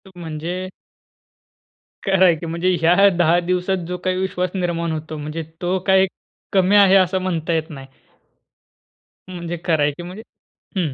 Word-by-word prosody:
म्हणजे 175 Hz, +2 st, -5 dB, 1.3 s
करायची, 180 Hz, -4 st, +3 dB
म्हणजे 170 Hz, +3 st, 0 dB
ह्या 180 Hz, +4 st, +5 dB
10 175 Hz, 0 st, +4 dB
दिवसात 180 Hz, 0 st, -1 dB
जो 180 Hz, 0 st, -4 dB
काही 185 Hz, 0 st, 0 dB
विश्वास 185 Hz, -1 st, -1 dB
निर्माण 170 Hz, -2 st, -1 dB
होतो, 155 Hz, 0 st, -5 dB
म्हणजे 155 Hz, +2 st, -5 dB, 0.2 s
तो 180 Hz, +1 st, 0 dB
काही 190 Hz, 0 st, +5 dB, 0.5 s
कमी 190 Hz, +1 st, +3 dB
आहे, 195 Hz, -1 st, +6 dB
असं 185 Hz, 0 st, +3 dB
म्हणता 170 Hz, -2 st, -2 dB
येत 160 Hz, 0 st, -1 dB
नाही. 135 Hz, -4 st, -10 dB, 1.5 s
म्हणजे 175 Hz, -1 st, -5 dB
करायची 160 Hz, -1 st, 0 dB
म्हणजे 185 Hz, +5 st, -8 dB, 0.6 s
हम्म. 160 Hz, -7 st, -1 dB
175 Hz, 130 wpm, -20 LUFS, 165-185 Hz, 1.5 s, आहे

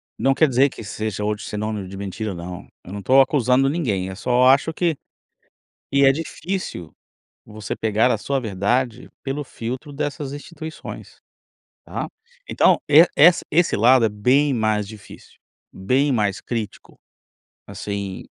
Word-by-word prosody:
não 135 Hz, 0 st, +1 dB
quer 155 Hz, +3 st, +4 dB
dizer 135 Hz, +1 st, +3 dB
que 115 Hz, -, -10 dB
seja 105 Hz, 0 st, -4 dB
hoje 105 Hz, 0 st, -2 dB
sinônimo 105 Hz, -2 st, -4 dB
de 95 Hz, -, -9 dB
mentira 100 Hz, +1 st, -5 dB
não. 90 Hz, +1 st, -8 dB, 0.2 s
Eu 90 Hz, -, -10 dB
não 100 Hz, -, -5 dB
tô 130 Hz, +7 st, +4 dB
acusando 135 Hz, -1 st, +3 dB
ninguém. 110 Hz, -, -1 dB
Eu 95 Hz, -, -7 dB
só 125 Hz, +3 st, +2 dB
acho 140 Hz, +4 st, +4 dB
que 165 Hz, -1 st, 0 dB, 1.0 s
que 140 Hz, 0 st, +4 dB
é 135 Hz, -, +7 dB
difícil 160 Hz, -, -5 dB, 0.5 s
você 105 Hz, -1 st, -6 dB
pegar 110 Hz, +2 st, +2 dB
a -, -, +2 dB
sua 135 Hz, +5 st, -2 dB
verdade 110 Hz, +3 st, -1 dB
pelo 140 Hz, +2 st, -3 dB
filtro 130 Hz, +4 st, -6 dB
dessas 145 Hz, -1 st, -4 dB
instituições. 160 Hz, +2 st, -9 dB, 0.6 s
Tá? -, -, -5 dB, 0.4 s
Então -, -, +3 dB
e 155 Hz, +4 st, +8 dB
ess 170 Hz, +4 st, +6 dB
esse 170 Hz, +2 st, +3 dB
lado 120 Hz, +3 st, +5 dB
é -, -, +1 dB
bem 130 Hz, +8 st, +2 dB
mais 110 Hz, -4 st, 0 dB
difícil, 110 Hz, -2 st, -14 dB, 0.3 s
bem 130 Hz, +9 st, +1 dB
mais 105 Hz, -6 st, 0 dB
crítico. 110 Hz, -4 st, -6 dB, 0.7 s
Assim, 100 Hz, -2 st, -5 dB
125 Hz, 145 wpm, -22 LUFS, 105-140 Hz, 1.0 s, e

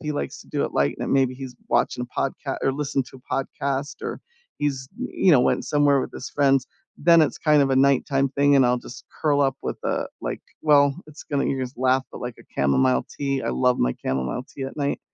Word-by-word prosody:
he 150 Hz, -1 st, -3 dB
likes 145 Hz, -, -4 dB
to -, -, -15 dB
do -, -, -1 dB
it -, -, -4 dB
light, 70 Hz, 0 st, +1 dB
and -, -, -2 dB
maybe 130 Hz, -2 st, +2 dB
he's 130 Hz, -1 st, -7 dB, 0.2 s
watching 125 Hz, 0 st, +1 dB
a -, -, -27 dB
podca 135 Hz, 0 st, -2 dB
or 135 Hz, -, +2 dB
listening 140 Hz, -1 st, -1 dB
to 130 Hz, 0 st, -14 dB
a -, -, +1 dB, 0.2 s
podcast, 140 Hz, +2 st, -2 dB
or -, -, -4 dB, 0.4 s
he's, 135 Hz, -3 st, -2 dB
y 255 Hz, +1 st, -4 dB
you 185 Hz, -, +4 dB
know, 130 Hz, -, +6 dB
went -, -, +1 dB
somewhere 145 Hz, -2 st, +3 dB
with -, -, -5 dB
his 125 Hz, -, -7 dB
friends, 135 Hz, -2 st, +2 dB, 0.3 s
then 170 Hz, +1 st, +5 dB
it's 155 Hz, -, 0 dB
kind 150 Hz, -2 st, +4 dB
of 135 Hz, -1 st, +2 dB
a 130 Hz, -, +2 dB
nighttime 135 Hz, 0 st, +3 dB
thing 140 Hz, +1 st, +3 dB
and 135 Hz, -, +6 dB
I'll 125 Hz, 0 st, +2 dB
just 120 Hz, 0 st, -11 dB, 0.2 s
curl 145 Hz, -2 st, +2 dB
up 135 Hz, -2 st, +2 dB
with -, -, -4 dB
a, -, -, -1 dB
like -, -, -4 dB, 0.2 s
well, 145 Hz, -2 st, +5 dB
it's 150 Hz, 0 st, -12 dB
gonna 140 Hz, -1 st, -1 dB
you'll 135 Hz, -, -1 dB
just 125 Hz, 0 st, -10 dB
laugh, 130 Hz, +1 st, +2 dB
but, -, -, -8 dB
like, 125 Hz, -1 st, -5 dB
a -, -, -15 dB
chamomile 65 Hz, -2 st, +2 dB
tea, 135 Hz, -1 st, -2 dB
I -, -, -2 dB
love 125 Hz, -1 st, +2 dB
my 60 Hz, 0 st, +1 dB
chamomile 65 Hz, -, -2 dB
tea 135 Hz, -, -8 dB
at 135 Hz, -, -7 dB
night, 145 Hz, -1 st, -1 dB
135 Hz, 240 wpm, -24 LUFS, 125-145 Hz, 0.4 s, know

